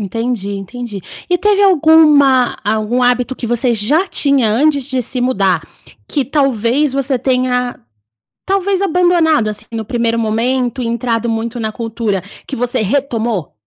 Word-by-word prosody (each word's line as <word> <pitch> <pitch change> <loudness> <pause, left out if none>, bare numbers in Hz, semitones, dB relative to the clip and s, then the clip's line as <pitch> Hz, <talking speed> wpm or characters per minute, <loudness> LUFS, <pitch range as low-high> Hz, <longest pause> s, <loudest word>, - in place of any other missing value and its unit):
Entendi, 225 0 -3
entendi, 205 +2 -6 0.3
e 355 - +3
teve 410 +2 +2
alguma 300 -8 +5
algum 215 +4 0
hábito 250 +1 +1
que 240 - -6
você 240 0 +1
já 290 - +1
tinha 280 -8 +1
antes 280 +5 +2
de 260 -1 -2
se 250 +2 -5
mudar, 195 -10 +1 0.4
que 280 - -1
talvez 270 0 +1
você 270 -1 -1
tenha 250 -1 0 0.7
talvez 390 0 0
abandonado, 345 - +2
assim, 210 -1 -6
no 225 -1 -4
primeiro 230 0 -1
momento, 245 +3 -1
entrado 235 0 -1
muito 230 +1 -3
na 220 -2 -3
cultura, 225 -4 -3 0.2
que - - -5
você 245 -1 -1
retomou? 230 - -1
245 Hz, 140 wpm, -15 LUFS, 225-280 Hz, 0.7 s, alguma